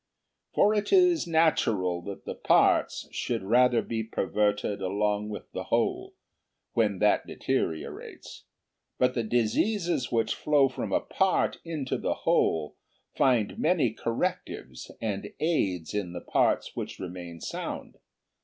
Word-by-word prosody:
For 210 +1 +4
it 210 -1 -1
is 360 - +4
natural 110 - +2
that 100 -1 -7
the - - -4
parts - - +2
should - - -2
rather 120 +3 +4
be 115 -1 -3
perverted 105 -2 -1
along 105 +2 0
with 105 - -8
the - - -5
whole, - - -1 0.6
when 105 -4 +2
that 105 +2 +2
deteriorates; 80 -1 -4 0.5
but 125 0 +2
the 120 - 0
diseases 125 - 0
which 115 -2 +1
flow 145 -3 +3
from 130 - -5
a - - +2
part 190 -1 +1
into 155 -6 -3
the - - -1
whole 80 -2 +1 0.4
find 125 - +2
many 160 - +2
correctives 115 - -3
and 105 -2 -4
aids 95 - 0
in 100 -4 -2
the 85 - -6
parts - - +1
which - - -5
remain 90 -2 -7
sound. - - -6
115 Hz, 130 wpm, -28 LUFS, 100-155 Hz, 0.6 s, For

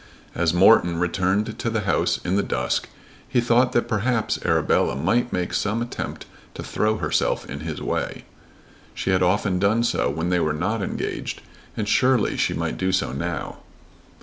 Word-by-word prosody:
As 80 -2 +1
Morton 90 -1 +5
returned 95 +5 0
to 115 - -1
the 110 -1 -1
house 95 -5 +1
in 90 +2 0
the 100 - +3
dusk 65 -8 -1 0.4
he 130 -2 +2
thought 120 +1 +3
that 120 - +1
perhaps 115 +2 0
Arabella - - +2
might 120 - +1
make 90 -1 -2
some 105 +2 0
attempt 120 0 -5 0.3
to - - -6
throw 110 0 0
herself - - 0
in 70 - -6
his 80 0 -5
way. - - -3 0.7
She - - -1
had 95 0 +2
often 90 +1 +1
done 105 +4 +2
so 120 - +1
when 80 +3 -2
they 90 - +3
were 80 -2 +1
not 100 +8 -1
engaged, - - -4 0.4
and 105 - -2
surely 130 -1 +3
she - - 0
might - - -3
do 95 0 +1
so 95 -8 0
now. 70 - -4
100 Hz, 175 wpm, -23 LUFS, 90-115 Hz, 0.7 s, Morton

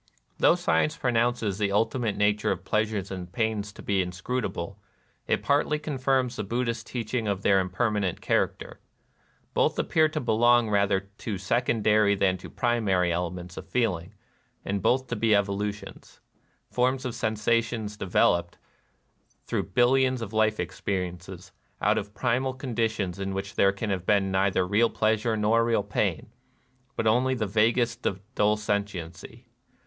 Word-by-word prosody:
Though - - +5
science 80 -1 +1
pronounces 115 -4 0
the 100 -1 +1
ultimate 110 +1 0
na 105 0 +4
ture 105 - -1
of - - -11
pleasures 105 -3 -1
and 90 -2 -6
pains 110 -1 -1
to - - -12
be 100 -2 +1
inscrutable, 90 0 -4 0.5
it - - 0
partly 145 +1 +2
confirms 130 -4 0
the 105 - -2
Buddhist 115 +2 -2
teaching 115 -1 -3
of 100 -1 -2
their 100 -1 +4
impermanent 95 0 -1
character. - - -1 0.7
Both - - +2
appear 155 -1 +2
to 155 - -3
belong 120 -2 +3
rather 100 -1 +2
to 100 +1 -6
secondary 105 0 +2
than 95 -1 +1
to - - -11
primary 100 -8 +1
elements 90 +1 -4
of - - -8
feeling, 105 -5 -1 0.5
and 100 0 -2
both 130 +6 +2
to - - -1
be 110 -2 +3
evolutions, 100 +1 -3 0.2
— - - -42
forms 130 +2 +1
of 125 - -3
sensation 110 +1 0
developed, 85 -2 +1 0.9
through - - -2
bil 120 0 +3
lions 130 -2 +2
of 110 -1 -8
life 110 0 +2
experiences, 90 -1 -4 0.3
out - - +2
of 105 +1 -9
primal 130 +1 0
con 130 -2 -6
ditions 105 -5 -1
in 95 0 -3
which 100 +2 -4
there 100 -3 +4
can 100 +2 -4
have 95 -2 -3
been 100 -2 +2
neither 95 -1 +2
real 105 +5 +3
pleasure 110 +1 +1
nor 110 +2 +3
real 115 -3 +1
pain, - - -2 0.6
but 115 - -2
only 125 +4 +3
the 115 -4 -1
vaguest 115 +3 +1 0.3
dull 105 -1 +2
sentiency. 100 +1 -4
105 Hz, 155 wpm, -27 LUFS, 95-120 Hz, 0.9 s, Though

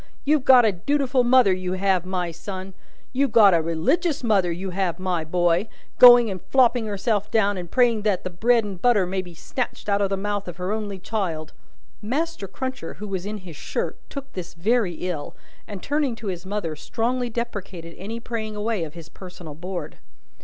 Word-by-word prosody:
You've 295 -2 +2
got 250 -3 +8
a 215 - +4
dutiful 260 +6 +1
mother, 245 -5 +5
you 185 0 -3
have, 185 -1 +1
my 180 -2 -2
son. 185 +3 -7 0.4
You've 270 -1 +1
got 205 -4 +7
a 165 - +4
religious 265 - 0
mother, 195 -6 +2
you 185 +3 -4
have, 180 -2 -1
my 185 -3 -1
boy: 175 +4 +1 0.3
going 245 -1 +9
and 185 -2 -6
flopping 245 -3 +3
herself 210 0 -1
down, 205 -3 +2
and 175 -2 -6
praying 240 -2 +3
that 205 -3 0
the 185 - -4
bread 230 +6 +3
and 195 -4 -7
butter 230 -6 +4
may 190 +1 -2
be 175 -2 -12
snatched 250 +8 -4
out 200 0 +2
of 200 - +1
the 195 - -1
mouth 205 0 -3
of 175 -1 -7
her 180 +2 -3
only 210 -2 -3
child." 180 -6 -3 0.5
Master 280 +1 -2
Cruncher 260 -3 -5
(who 210 - -7
was 190 -1 -4
in 210 +1 -4
his 170 -4 -9
shirt) - - -3
took 275 -1 -8
this 180 -1 -7
very 205 +1 +1
ill, 160 -5 -4 0.3
and, 200 -3 -8
turning 285 -4 0
to 220 -3 -5
his 180 0 -6
mother, 190 -6 -3
strongly 245 +8 -2
deprecated 200 -8 -5
any 220 +5 -5
praying 220 -2 -4
away 210 -3 -1
of 155 0 -7
his 165 -2 -10
personal 180 -4 -10
board. 180 +4 -6
200 Hz, 195 wpm, -24 LUFS, 180-235 Hz, 0.5 s, going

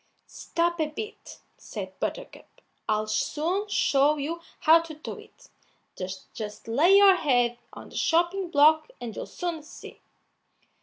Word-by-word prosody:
"Stop 345 0 -2
a 310 - +1
bit," 420 +9 -9 0.2
said - - -8
Buttercup; - - -5 0.4
"I'll 215 0 +1
soon 325 - -1
show 290 -2 +3
you 320 +4 -4 0.2
how 320 +2 +7
to 330 -2 -8
do 310 - -8
it; - - -18 0.8
just 210 -1 -7
lay 315 +12 +5
your 395 -2 +7
head 245 -6 +1
on - - -11
the - - -14
chopping 345 +3 +1
block, 310 +4 +4
and 230 -3 -7
you'll - - -6
soon 345 -3 -4
see." 300 - -13
315 Hz, 140 wpm, -26 LUFS, 275-345 Hz, 0.8 s, how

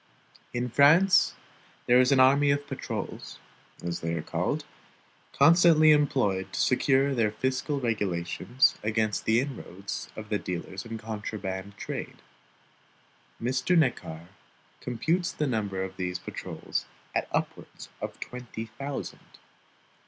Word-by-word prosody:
In 120 0 -2
France, 165 +9 +5 0.5
there 125 +1 +5
is 125 - +3
an 135 - +5
army 140 +2 +5
of 145 0 +1
patrols - - -6 0.5
(as 85 -1 -3
they 85 0 -2
are 80 - -3
called) - - -2 0.7
constantly 155 +1 +6
employed 130 -10 +2
to - - -3
secure 135 +1 +3
their 115 -4 +2
fiscal 130 +6 -1
regulations 105 +1 0
against 110 0 0
the 110 +1 +4
inroads 100 -8 -5
of 110 -1 -8
the 105 -2 0
dealers 90 +3 -5
in 115 -1 -5
contraband 105 -3 -5
trade. - - -6 1.2
Mr. 125 +8 +1
Neckar 85 - 0 0.5
computes 165 +9 -1
the 150 - -2
number 105 -7 -1
of 95 - -7
these 90 -1 -2
patrols - - -5 0.3
at - - 0
upwards - - -4
of - - -5
twenty 125 -2 -7
thousand. 140 0 -6
120 Hz, 125 wpm, -28 LUFS, 100-140 Hz, 1.2 s, constantly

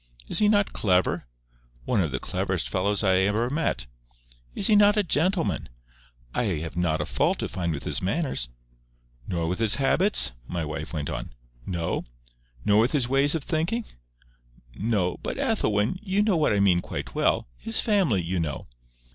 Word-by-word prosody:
"Is - - 0
he 210 -1 +4
not 205 -2 +2
clever?" 90 - +1 0.6
"One 110 -5 +2
of 80 - 0
the 65 - -2
cleverest - - -2
fellows 100 +2 0
I 95 -2 +4
ever 105 +6 +1
met" 145 - -1 0.7
"Is - - 0
he 215 - +5
not 205 +1 +5
a 210 - +3
gentleman?" 160 - 0 0.6
"I 125 - 0
have 80 -5 -3
not 80 -3 0
a - - -2
fault - - +1
to - - -2
find 85 -2 -3
with 70 -3 -4
his - - 0
manners." 100 - -1 0.8
"Nor 85 -2 -1
with 90 +4 -2
his 110 -2 +3
habits?" 140 - +4 0.2
my 85 -2 -3
wife 75 0 -5
went 75 -4 -3
on. - - -6 0.3
"No." 85 -3 -2 0.6
"Nor 105 +1 +4
with 120 +6 +1
his 135 -5 +2
ways 135 +4 +3
of 160 - -2
thinking?" 170 +10 -1 0.9
"No.—But, 100 - -1
Ethelwyn, 105 - 0
you 205 -1 +1
know 210 -3 +2
what 155 -2 +2
I 105 - +2
mean 95 -3 +4
quite - - -6
well. - - +1
His 110 - -1
family, 185 - +2
you 90 +2 -2
know." 75 -4 -3
105 Hz, 170 wpm, -26 LUFS, -, 0.9 s, he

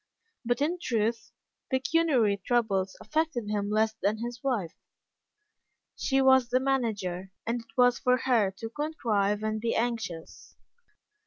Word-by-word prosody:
But, 245 +3 0
in 340 +5 0
truth, 230 -4 -1 0.4
pecuniary 260 -7 +2
troubles 200 -6 0
affected 310 -8 -1
him 205 -1 -1
less 220 +1 +2
than 205 +2 +1
his 240 +2 -6
wife. 225 -12 -1 1.2
She 270 -1 +1
was 260 -2 +5
the 255 - +3
manager, 210 -9 -1
and 235 +1 -1
it 225 +1 -23
was 245 -1 +4
for 250 0 +3
her 235 -5 +2
to 200 +4 -8
contrive 215 -9 -1
and 215 0 -2
be 230 0 0
anxious. 225 -8 -4
230 Hz, 135 wpm, -28 LUFS, 210-260 Hz, 1.2 s, was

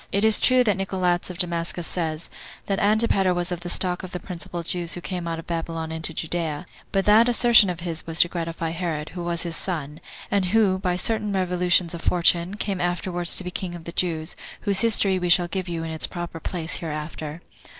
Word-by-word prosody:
It 200 - 0
is 220 -1 +8
true 255 -1 +5
that 210 -5 +1
Nicolaus 185 -2 0
of 180 - -7
Damascus 170 -1 -2
says, 160 -2 -4 0.3
that 195 -1 -1
Antipater 205 -3 +2
was 175 0 -1
of 175 - -3
the 175 0 -7
stock 180 0 +2
of 185 - -7
the 180 - -3
principal 175 -1 -6
Jews 170 0 -1
who - - -5
came 175 -1 -5
out 165 0 -3
of 165 - -8
Babylon 165 -1 -4
into 160 0 0
Judea; 160 0 -3 0.3
but 195 -1 0
that 220 +3 +6
assertion 235 -4 +6
of 175 -2 -4
his 165 -2 -5
was 165 0 0
to - - +6
gratify 165 -1 -4
Herod, 165 -3 -3
who 175 -1 -7
was 170 0 -1
his 170 -1 -4
son, 155 -5 -4 0.3
and 200 -2 +2
who, 195 -1 +2
by 180 -2 -1
certain 210 +2 -1
revolutions 180 -2 +1
of 170 - -6
fortune, 175 +2 +2
came 195 -3 -3
afterward 175 0 -2
to 185 - +4
be 180 - -5
king 180 -1 -5
of 170 - -10
the 170 - -7
Jews, 165 -2 -1 0.3
whose 200 -2 +1
history 205 -4 +4
we 180 -1 -2
shall 175 0 +5
give 185 0 -4
you 165 -1 -3
in 165 - -5
its 160 - +1
proper 175 -2 -6
place 165 0 -4
hereafter. 155 0 -6
175 Hz, 215 wpm, -24 LUFS, 165-190 Hz, 0.3 s, is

